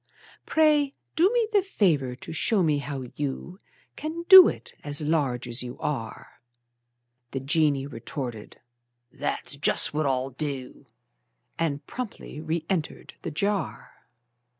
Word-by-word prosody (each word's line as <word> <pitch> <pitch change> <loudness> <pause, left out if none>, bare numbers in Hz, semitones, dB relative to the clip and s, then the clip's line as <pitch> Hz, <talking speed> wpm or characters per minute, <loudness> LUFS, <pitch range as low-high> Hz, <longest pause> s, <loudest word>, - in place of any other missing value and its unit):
Pray 300 -3 +3 0.2
do 350 +4 +5
me 475 -2 +2
the 405 - +5
favor 160 - +1
to 130 - -8
show 200 +4 +2
me 150 -3 +2
how 140 -2 -5
you 150 +6 -5 0.4
Can 320 +2 -5
do 375 0 +11
it, - - -5
as 145 0 -1
large 145 -6 0
as 120 +1 -1
you 125 0 -6
are." 130 -7 -5 0.9
The 135 - -3
genie 145 -1 +1
retorted: 120 -3 -7 0.5
"That's 145 0 -3
just 140 - +2
what 155 -1 0
I'll 130 0 0
do!" 135 -1 -5 0.7
And 150 -3 -1
promptly 240 - -7
reëntered 160 +1 -3
the - - -4
jar. 200 +6 -3
150 Hz, 125 wpm, -26 LUFS, 135-200 Hz, 0.9 s, do